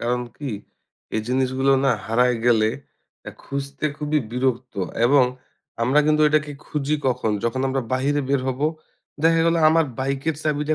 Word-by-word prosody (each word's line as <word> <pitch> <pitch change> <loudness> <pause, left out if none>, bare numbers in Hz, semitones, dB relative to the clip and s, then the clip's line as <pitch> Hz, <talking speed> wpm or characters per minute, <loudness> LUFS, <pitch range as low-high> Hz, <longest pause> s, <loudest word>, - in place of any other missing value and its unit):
কারণ 125 +1 0 0.2
কি 145 -3 -5 0.7
এই - - +1
জিনিসগুলো 130 +1 +1
না 135 - +4 0.2
হারায় 125 +2 +2
গেলে 110 -2 +4 0.6
আ - - -6
খুঁজতে 140 +1 -5
খুবই 150 0 0
বিরক্ত। 125 -1 -1 0.3
এবং 135 -1 +5 0.6
আমরা 135 +5 +4
কিন্তু 155 0 +3
এটাকে 150 -1 +1
খুঁজি 150 0 -1
কখন? 120 -3 0
যখন 120 +3 -1
আমরা 135 -1 -1
বাহিরে 140 +3 +1
বের 140 -1 +2
হবো, 135 +4 0 0.6
দেখা 165 0 +4
গেল 165 - +3
আমার 165 0 +4
বাইকের 140 +4 -1
চাবিটা 150 0 0
135 Hz, 150 wpm, -22 LUFS, 125-150 Hz, 0.7 s, এবং